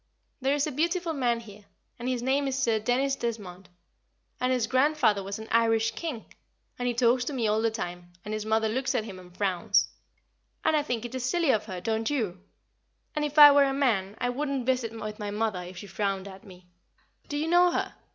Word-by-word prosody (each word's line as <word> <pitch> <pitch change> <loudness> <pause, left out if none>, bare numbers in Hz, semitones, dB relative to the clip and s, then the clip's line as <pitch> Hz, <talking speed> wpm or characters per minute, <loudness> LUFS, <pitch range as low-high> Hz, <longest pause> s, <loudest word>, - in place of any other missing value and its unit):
There 270 +2 +2
is 290 - +1
a 305 - -3
beautiful 335 +4 0
man 240 -5 0
here, 210 -2 -14 0.3
and 245 +2 -3
his 250 -2 -2
name 275 +2 +1
is 270 0 -2
Sir 230 -5 +1
Dennis 255 +5 +1
Desmond, 195 -7 -5 0.7
and 255 0 +1
his 250 -3 +1
grandfather 260 -4 +2
was 195 +1 -5
an 220 0 -9
Irish 225 -1 +3
King, 240 -1 -5 0.5
and 245 - -1
he 245 - +1
talks 245 +1 +3
to 295 - -3
me 240 -4 0
all 215 +1 +2
the 225 - +2
time, 175 -5 -6
and 210 - -4
his 215 0 -2
mother 220 +1 +1
looks 255 +4 -1
at - - +1
him 195 -4 -9
and 180 0 -16
frowns; 185 -4 +1 0.8
and 315 - +4
I 300 - +3
think 245 -5 -3
it 255 +2 -5
silly 305 +4 +2
of 215 - 0
her, 185 -4 -6
don't 220 +2 -1
you? 215 -11 -2 0.7
And 300 - 0
if 295 0 -3
I 295 -1 +11
were 285 0 +5
a 270 - 0
man 220 -7 0
I 245 - 0
wouldn't 275 0 -2
visit 250 -3 0
with 215 -2 -7
my 205 -1 -4
mother 210 -2 -1
if 180 +1 -9
she 190 - -8
frowned 195 -1 -2
at 190 +1 -11
me. 185 -4 -15 0.6
Do 290 - -2
you 305 +2 -1
know 350 +1 +5
her? - - -2
230 Hz, 220 wpm, -27 LUFS, 210-270 Hz, 0.8 s, I